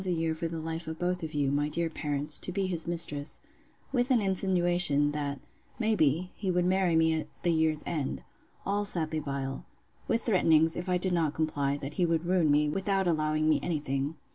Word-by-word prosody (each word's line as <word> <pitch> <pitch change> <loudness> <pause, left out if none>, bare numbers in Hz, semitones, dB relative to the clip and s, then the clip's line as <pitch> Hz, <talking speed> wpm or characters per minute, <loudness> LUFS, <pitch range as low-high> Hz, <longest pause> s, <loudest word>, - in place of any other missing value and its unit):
a 190 - +2
year 165 -1 0
for 165 +1 -3
the 165 0 -5
life 165 +1 -4
of 160 0 -5
both 180 +1 -1
you, 140 -2 +1
my 145 +1 0
dear 170 +2 -1
parents, 150 -2 0
to - - -1
be 195 +1 -1
his 170 -3 0
mistress; 165 -4 +1 0.5
with 250 -1 +1
an 255 -3 +4
insinuation, 175 -6 +2
that, 145 -2 -3 0.4
may 225 -2 +1
be, 160 +2 +1
he 195 - -3
would 180 -1 +1
marry 185 -2 +2
me 160 0 +3
at 160 -1 -2 0.2
the 175 - +2
year's 160 -1 +1
end: 140 - -3 0.5
All 205 +1 0
sadly 160 -5 +1
vile: 140 -2 -4 0.4
With 230 - 0
threatenings, 165 -6 +4
if 175 +2 -5
I 180 - +2
did 180 0 -1
not 160 -4 0
comply, 145 -3 -1
that 140 0 -6
he 175 - +3
would 165 0 0
ruin 175 -3 +2
me, 150 +1 +3
without 195 +4 0
allowing 155 -2 +1
me 155 - +3
any 170 -3 -1
thing. 140 +1 -2
160 Hz, 205 wpm, -29 LUFS, 150-180 Hz, 0.5 s, an